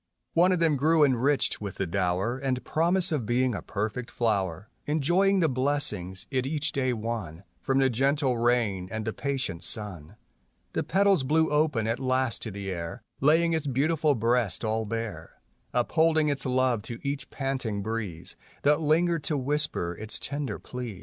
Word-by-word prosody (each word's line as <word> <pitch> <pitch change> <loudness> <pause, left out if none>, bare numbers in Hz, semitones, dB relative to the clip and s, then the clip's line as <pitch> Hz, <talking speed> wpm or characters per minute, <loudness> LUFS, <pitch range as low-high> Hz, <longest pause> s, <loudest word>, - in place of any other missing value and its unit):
One 175 +3 +5
of 180 - +2
them 165 -4 +2
grew 155 +3 +4
enriched 135 -1 +2
with 100 -2 -5
the 95 - -1
dower 95 +7 0
And 130 -2 -1
promise 175 +3 +2
of 135 -9 -1
being 125 +1 +2
a - - -4
perfect 110 +4 -3
flower, 100 -5 -1 0.2
Enjoying 175 +6 +3
the 165 - +4
blessings 130 - -2
it 130 0 0
each 150 +1 -1
day 130 -2 0
won 110 -7 -4 0.2
From 135 - 0
the 135 -1 +4
gentle 135 +2 +1
rain 115 -6 +1
and 110 -1 -3
the 110 - -2
patient 130 -11 -3
sun. 95 -9 -4 0.6
The - - 0
petals 195 -5 +3
blew 160 +4 +2
open 150 -7 +2
at 115 +2 -1
last 130 -3 0
to 110 - -5
the 100 -1 -5
air 85 +6 -5 0.2
Laying 165 +4 +4
its 160 -2 -1
beautiful 150 +3 +2
breast 115 -3 +1
all 110 0 0
bare, 110 -7 -5 0.3
Upholding 155 +5 +2
its 140 -2 -2
love 130 -3 +2
to 115 +2 -7
each 140 -2 -3
panting 130 -7 -3
breeze 105 -7 -4 0.3
That 150 +2 +4
lingered 165 +1 +2
to 150 - +1
whisper 140 - -1
its 110 +4 -1
tender 140 -6 -3
pleas. 120 -6 -7
130 Hz, 170 wpm, -27 LUFS, 110-150 Hz, 0.6 s, One